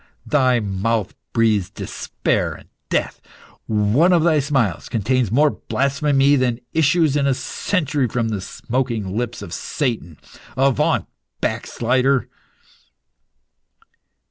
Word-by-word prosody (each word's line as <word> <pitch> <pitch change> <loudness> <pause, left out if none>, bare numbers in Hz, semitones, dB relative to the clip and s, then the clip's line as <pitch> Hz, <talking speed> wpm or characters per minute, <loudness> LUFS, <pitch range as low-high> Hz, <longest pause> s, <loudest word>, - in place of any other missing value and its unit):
Thy 130 -4 +3
mouth 105 +1 -1 0.2
breathes 110 -5 +2
despair - - -2
and - - -14 0.2
death. - - -1 0.5
One 110 - +3
of 170 -3 +4
thy 160 -3 +4
smiles 135 - 0
contains 120 0 0
more 145 +5 +4
blasphemy 140 +1 +1
than 125 -2 0
issues 160 -1 +3
in 140 -1 +2
a 135 - +2
century 150 -5 -1
from 115 0 -1
the 105 -3 -3
smoking 115 -3 -3
lips 120 +1 -3
of - - -8
Satan. 110 - -3 0.4
Avaunt, 135 -1 +2 0.3
backslider!" 130 +1 0
130 Hz, 110 wpm, -21 LUFS, 115-140 Hz, 0.5 s, of